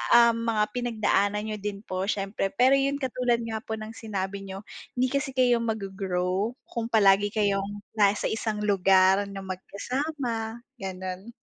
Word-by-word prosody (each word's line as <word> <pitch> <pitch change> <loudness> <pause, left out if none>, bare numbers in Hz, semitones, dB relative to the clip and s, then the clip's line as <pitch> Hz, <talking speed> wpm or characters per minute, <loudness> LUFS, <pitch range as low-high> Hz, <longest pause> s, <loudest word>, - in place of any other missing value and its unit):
ah, 235 0 +8
mga 230 -2 +1
pinagdaanan 215 -4 +1
niyo 215 -1 -3
din 200 0 -4
po 185 -2 -3
siyempre. 195 -1 -1
Pero 255 +5 +5
'yun 275 +1 +1
katulad 250 -3 0
nga 220 -1 -3
po 220 0 -5
ng 215 0 -7
sinabi 195 -2 -4
niyo, 195 +1 -7 0.3
hindi 255 +1 +2
kasi 275 -1 -1
kayo 245 -2 +4
maggo-grow 195 -1 -1
kung 230 -2 -3
palagi 205 -3 +5
kayong 205 -1 0
nasa 205 -1 +3
isang 220 -1 -2
lugar 195 -1 +4
na 195 0 -6
magkasama, 230 - -3 0.2
gano'n. 185 +3 -6
210 Hz, 145 wpm, -27 LUFS, 195-235 Hz, 0.3 s, ah